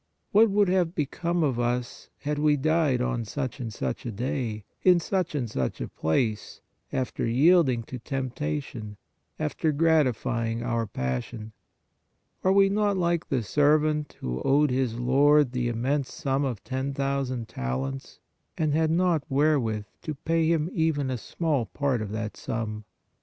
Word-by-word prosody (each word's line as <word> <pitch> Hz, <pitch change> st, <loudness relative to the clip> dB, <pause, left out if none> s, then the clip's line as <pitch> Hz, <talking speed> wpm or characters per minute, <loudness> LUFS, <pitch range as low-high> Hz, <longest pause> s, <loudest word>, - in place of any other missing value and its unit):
What 220 Hz, +2 st, +6 dB
would 200 Hz, 0 st, +3 dB
have 180 Hz, -2 st, +1 dB
become 170 Hz, +3 st, -1 dB
of 130 Hz, -5 st, 0 dB
us, 120 Hz, 0 st, -2 dB
had 150 Hz, 0 st, -2 dB
we 150 Hz, 0 st, +3 dB
died 150 Hz, -3 st, +2 dB
on 125 Hz, -2 st, -1 dB
such 130 Hz, +4 st, -4 dB
and 115 Hz, -3 st, -4 dB
such -, -, -3 dB
a 120 Hz, -, -4 dB
day, 115 Hz, -1 st, -3 dB, 0.2 s
in 180 Hz, -2 st, +5 dB
such 180 Hz, -2 st, -1 dB
and 130 Hz, -5 st, -1 dB
such 65 Hz, -12 st, -2 dB
a -, -, -3 dB
place, 105 Hz, +7 st, -1 dB, 0.3 s
after 130 Hz, -1 st, -2 dB
yielding 130 Hz, 0 st, +4 dB
to 125 Hz, +2 st, -8 dB
tempta 140 Hz, +4 st, -3 dB
tion, 105 Hz, -5 st, -9 dB, 0.4 s
after 155 Hz, +1 st, 0 dB
gratifying 125 Hz, -7 st, +1 dB
our 115 Hz, -2 st, -1 dB
passion? 95 Hz, -, -4 dB, 0.9 s
Are 185 Hz, -, +4 dB
we 195 Hz, 0 st, +6 dB
not 205 Hz, 0 st, +1 dB
like 170 Hz, -2 st, 0 dB
the 130 Hz, -4 st, 0 dB
servant 150 Hz, +5 st, +2 dB
who 65 Hz, +1 st, -3 dB
owed 145 Hz, +1 st, +3 dB
his 125 Hz, -3 st, 0 dB
lord 140 Hz, +3 st, +4 dB
the 125 Hz, -1 st, -1 dB
immense 130 Hz, +4 st, -1 dB
sum 135 Hz, +1 st, -1 dB
of 120 Hz, -7 st, -4 dB
ten 130 Hz, +1 st, -3 dB
thousand 135 Hz, -4 st, -1 dB
talents, 65 Hz, +2 st, -4 dB, 0.4 s
and 155 Hz, -2 st, +1 dB
had 160 Hz, +1 st, +2 dB
not 170 Hz, -2 st, +2 dB
wherewith 135 Hz, -7 st, +1 dB, 0.2 s
to 155 Hz, -, -4 dB
pay 165 Hz, +3 st, +1 dB
him 160 Hz, -1 st, +2 dB
even 150 Hz, -5 st, +1 dB
a 125 Hz, -, -1 dB
small 145 Hz, -4 st, -1 dB
part 135 Hz, 0 st, -1 dB
of 105 Hz, -2 st, -4 dB
that 110 Hz, 0 st, -4 dB
sum? 110 Hz, -2 st, -4 dB
135 Hz, 160 wpm, -27 LUFS, 115-155 Hz, 0.9 s, What